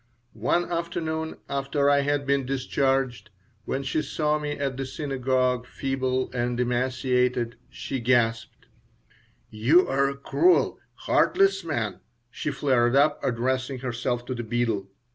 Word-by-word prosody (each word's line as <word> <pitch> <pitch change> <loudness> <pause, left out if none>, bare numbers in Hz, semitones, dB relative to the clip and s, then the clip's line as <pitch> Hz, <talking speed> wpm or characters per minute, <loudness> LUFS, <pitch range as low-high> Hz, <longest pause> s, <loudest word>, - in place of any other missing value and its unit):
One 170 +11 0
afternoon, 160 -2 -3
after 140 +1 0
I 145 0 +5
had 145 0 0
been 140 0 +2
discharged, 130 -3 -1 0.4
when 135 - -2
she 145 +3 0
saw 150 0 0
me 150 -1 -3
at 140 -2 -2
the 135 - -3
synagogue, 130 -3 -1
feeble 130 -1 -2
and 120 -1 -1
emaciated, 125 -1 0
she 135 0 -5
gasped 115 -2 0 0.9
"You're 135 +4 +3
a 140 - -6
cruel, 355 - +2 0.3
heartless 195 -1 +3
man," 120 -10 -2 0.3
she 155 - -3
flared 130 -3 +2
up, 145 +2 +3
addressing 130 +2 -1
herself 120 -1 -2
to 130 - -3
the 120 - -4
beadle. 115 -4 -1
130 Hz, 125 wpm, -26 LUFS, 120-140 Hz, 0.9 s, I